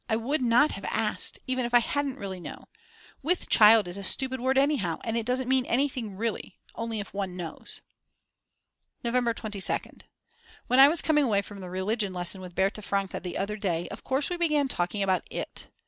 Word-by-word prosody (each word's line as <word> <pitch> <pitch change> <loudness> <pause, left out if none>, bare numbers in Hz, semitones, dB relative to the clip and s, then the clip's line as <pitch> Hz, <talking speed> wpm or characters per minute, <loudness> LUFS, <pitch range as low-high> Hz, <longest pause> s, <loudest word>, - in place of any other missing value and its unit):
I 220 - +2
would 260 +7 -1
not 245 +4 +4
have - - -6
asked, - - 0
even 255 -1 -1
if 240 0 0
I - - +9
hadn't 280 +2 -1
really 195 -6 -6
known. - - -9 0.6
With 345 +5 0
child 215 -2 +7
is 175 +2 -3
a 200 - -6
stupid 260 +6 0
word 260 +1 +1
anyhow, 270 - +2
it 225 0 -1
doesn't 250 0 0
mean 260 0 +3
anything 245 -6 -1
really; 225 -3 -3 0.2
only 230 -1 -4
if 205 - -7
one 195 -2 -4
knows. 170 -3 -5 1.2
November 235 -1 +1
22nd. 210 -4 -3 0.6
When 250 - +3
I 270 - +11
was 320 +3 +4
coming 300 -2 +3
away 200 -4 +1
from 200 0 -10
the 185 -2 -7
religion 195 +2 -1
lesson 180 +1 -4
with 180 -1 -10
Berta 195 +3 0
Franke 195 -1 -2
the 180 -2 -5
other 205 +2 -2
day, 175 -4 -1
of - - -9
course 270 +5 -1
we 355 - -1
began 305 -5 +2
talking 200 -3 -1
about 190 -2 +2
it. - - -6
225 Hz, 195 wpm, -27 LUFS, 195-260 Hz, 1.2 s, I